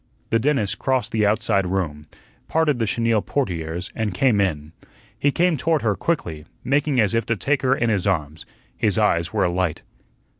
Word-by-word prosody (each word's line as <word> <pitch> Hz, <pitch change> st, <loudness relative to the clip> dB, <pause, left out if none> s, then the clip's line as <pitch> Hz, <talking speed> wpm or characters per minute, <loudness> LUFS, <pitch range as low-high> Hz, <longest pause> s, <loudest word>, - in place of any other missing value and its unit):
The 115 Hz, -, +3 dB
dentist 125 Hz, -6 st, 0 dB
crossed 130 Hz, -2 st, 0 dB
the 105 Hz, -2 st, +2 dB
outside 100 Hz, -3 st, +1 dB
room, 80 Hz, -6 st, -3 dB, 0.4 s
parted 155 Hz, -5 st, +1 dB
the 115 Hz, -, 0 dB
chenille 115 Hz, 0 st, +1 dB
portieres, 90 Hz, -, -3 dB
and 105 Hz, -5 st, -2 dB
came 115 Hz, -3 st, +3 dB
in. 75 Hz, -5 st, -2 dB, 0.5 s
He 145 Hz, -, +2 dB
came 175 Hz, +1 st, +2 dB
toward 160 Hz, -1 st, 0 dB
her 105 Hz, -3 st, +1 dB
quickly, 80 Hz, -, -2 dB, 0.2 s
making 145 Hz, 0 st, +1 dB
as 105 Hz, -4 st, +3 dB
if 115 Hz, 0 st, +1 dB
to 115 Hz, -, +1 dB
take 135 Hz, +6 st, 0 dB
her 130 Hz, 0 st, +2 dB
in 120 Hz, -3 st, 0 dB
his 100 Hz, -2 st, 0 dB
arms. 80 Hz, -4 st, -2 dB, 0.3 s
His -, -, +1 dB
eyes 85 Hz, +1 st, +2 dB
were 105 Hz, -3 st, +1 dB
alight. 90 Hz, -2 st, -1 dB
105 Hz, 180 wpm, -22 LUFS, 90-135 Hz, 0.5 s, The